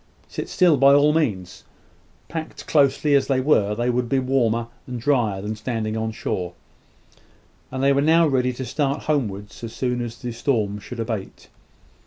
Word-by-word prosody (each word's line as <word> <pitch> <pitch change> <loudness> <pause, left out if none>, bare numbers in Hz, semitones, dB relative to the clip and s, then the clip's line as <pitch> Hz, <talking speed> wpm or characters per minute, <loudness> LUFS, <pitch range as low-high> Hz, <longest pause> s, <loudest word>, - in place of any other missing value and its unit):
Sit - - -6
still, 175 -5 +4
by 140 +1 +6
all 145 +1 +4
means. 105 - -1 0.6
Packed 160 -1 -6
closely 145 0 +3
as 140 -1 +3
they 135 -2 +2
were, 105 -7 +2
they 120 +2 0
would 120 -1 -1
be 135 - +2
warmer 125 -3 +1 0.2
and 125 -1 -5
drier 115 -7 +1
than 105 +1 -3
standing 110 -1 -3
on 110 0 -2
shore; 90 -4 -3 1.2
and 130 0 -4
they 140 0 +5
were 140 - +2
now 165 +2 +4
ready 125 -3 +1
to 130 +1 -5
start 140 +3 -1
homewards 105 -9 -2
as 115 -1 -6
soon 125 -1 -1
as 120 0 -5
the 125 - -5
storm 110 -4 -1
should 120 +4 -9
abate. 110 -4 -5
125 Hz, 175 wpm, -23 LUFS, 110-140 Hz, 1.2 s, by